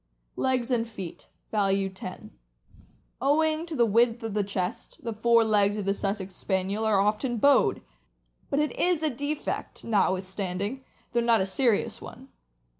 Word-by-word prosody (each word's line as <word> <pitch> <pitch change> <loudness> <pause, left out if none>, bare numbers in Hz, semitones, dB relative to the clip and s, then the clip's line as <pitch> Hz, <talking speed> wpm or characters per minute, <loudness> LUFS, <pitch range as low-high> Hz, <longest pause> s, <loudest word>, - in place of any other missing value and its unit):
Legs 255 -1 0
and 230 -2 +1
feet 195 -6 -8 0.2
(value 195 -2 +2
10). 190 -1 -9 0.5
— - - -30
Owing 310 +4 +2
to 330 - -4
the 235 - +4
width 230 +2 +2
of 210 -3 -1
chest, 200 +3 -4
the 230 -1 -3
fore 230 +1 +4
legs 205 -1 +2
of 205 - -3
the 195 - +2
Sussex 195 -1 -3
Spaniel 190 +4 -1
are 210 -3 +3
often 215 +5 +1
bowed; 280 +5 +4 0.7
but 280 - 0
it 300 0 +1
is 350 -3 +1
a 310 - +1
defect, 285 +4 -4
notwithstanding, 195 +2 -1 0.3
though 240 - +3
not 235 -1 +3
a 190 - +1
serious 220 +3 +1
one. - - -11
220 Hz, 155 wpm, -27 LUFS, 195-250 Hz, 0.7 s, the